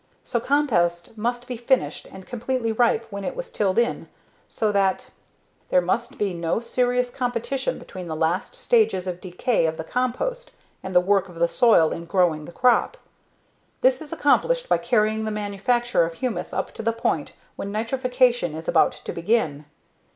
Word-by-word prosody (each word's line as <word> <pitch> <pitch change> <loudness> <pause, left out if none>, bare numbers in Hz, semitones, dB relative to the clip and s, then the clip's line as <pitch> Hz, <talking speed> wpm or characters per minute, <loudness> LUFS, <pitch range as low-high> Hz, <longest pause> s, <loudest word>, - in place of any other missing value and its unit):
So 235 - -1
compost 220 -11 +1
must 240 +3 -2
be 250 - -5
finished 240 +3 0
and 190 -1 -11
completely 245 -1 -2
ripe 230 0 +2
when 200 0 -5
it - - -3
was - - -6
tilled 195 -3 0
in 235 0 +1 0.4
so 215 -1 0
that: 195 -2 0 0.3
"... - - -40
there - - +5
must 235 +9 -1
be 200 -3 -1
no 170 +3 -1
serious 245 +1 0
competition 250 +1 -2
between 185 -2 -9
the 160 - -4
last 165 - -1
stages 440 - +2
of 180 -1 -5
decay 185 +1 0
of 160 0 -3
the 160 - -4
compost 255 - -2 0.3
and 190 -1 -6
the - - +9
work 195 +1 +1
of 175 - -13
the 170 +1 +2
soil 190 -7 +4
in 170 - -5
growing 170 -4 +1
the - - -10
crop. 250 - +2 0.8
This - - +3
is 315 - -10
accomplished - - +2
by - - +3
carrying 220 -2 +1
the - - -1
manufacture 210 +2 0
of 165 0 -3
humus 250 +4 -3
up - - -3
to - - -6
the 230 +1 0
point 165 -9 -1 0.2
when 200 - -5
nitrification 245 - +1
is 160 +1 -8
about - - +4
to - - -7
begin. 170 -6 0
220 Hz, 180 wpm, -24 LUFS, 180-250 Hz, 0.8 s, the